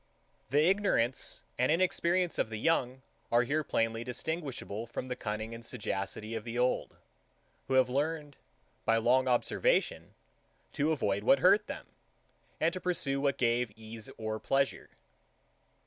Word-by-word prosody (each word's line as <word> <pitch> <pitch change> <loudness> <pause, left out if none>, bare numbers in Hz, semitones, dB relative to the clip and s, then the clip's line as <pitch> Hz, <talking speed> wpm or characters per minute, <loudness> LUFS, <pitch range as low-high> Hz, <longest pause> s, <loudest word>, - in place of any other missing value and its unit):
The 145 +3 +4
ignorance 185 - +1 0.2
and - - +3
inexperience 175 0 +2
of - - +1
the 110 - -4
young 130 -1 0 0.3
are 120 +1 +5
here 150 +5 0
plainly 115 -3 0
distinguishable 125 -4 -4
from 115 - -5
the 125 - -2
cunning 110 +1 -4
and 115 0 -8
sagacity 110 -2 -4
of 110 -1 -3
the 115 +1 -5
old, 125 +1 0 0.7
who 135 - +1
have 130 -1 +5
learned, 145 +2 -2 0.5
by 115 - +3
long 125 +3 +3
observation, - - +1 0.6
to 150 +2 +1
avoid 100 -9 0
what 135 - +6
hurt 210 +3 +4
them, - - -6 0.7
and 165 +2 +2
to 185 - -5
pursue 140 -7 0
what 140 -1 +1
gave 120 -1 +1
ease 110 0 -8
or 110 0 -3
pleasure. 135 +3 0
125 Hz, 145 wpm, -31 LUFS, 115-155 Hz, 0.7 s, what